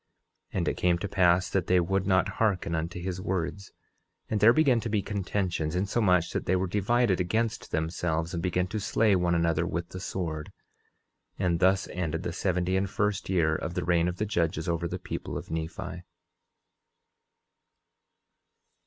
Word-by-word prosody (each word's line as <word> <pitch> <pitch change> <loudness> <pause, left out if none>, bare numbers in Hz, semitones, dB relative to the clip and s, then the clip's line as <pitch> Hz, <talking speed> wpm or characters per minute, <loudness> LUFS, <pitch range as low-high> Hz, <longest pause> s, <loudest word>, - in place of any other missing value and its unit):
10:18 - - -3
And - - 0
it - - 0
came 90 -1 +2
to 100 - -4
pass 90 -1 +3
that 95 -2 0
they 90 0 +4
would 95 +2 0
not 95 -1 +3
hearken 95 -6 +1
unto 85 +2 -2
his 90 0 -4
words; 95 +2 -3 0.6
and 110 - +1
there 105 +3 +7
began 135 -3 +4
to 115 - -4
be 105 -2 0
contentions, 95 -5 -2
insomuch 90 -3 +2
that - - -3
they 95 - +3
were 90 +1 +1
divided 105 +2 +1
against 110 +5 -1
themselves 80 +1 -1
and 85 - -2
began 90 0 0
to 110 +4 -4
slay 105 0 +2
one 90 -1 +2
another 85 0 +1
with 85 +1 -3
the 90 - -7
sword. 80 -5 -4 0.9
10:19 - - 0
And 85 -2 +1
thus 95 +1 +3
ended 85 -1 -3
the 85 - -3
seventy 90 0 0
and 95 0 0
first 105 0 -1
year 80 -4 +2
of 85 +2 -4
the 90 - -1
reign 85 -1 +3
of 90 0 -3
the 105 - -1
judges 85 -6 -1
over 85 0 0
the 90 - -4
people 95 +1 -5
of - - -8
Nephi. 80 0 -4
90 Hz, 180 wpm, -28 LUFS, 85-100 Hz, 0.9 s, there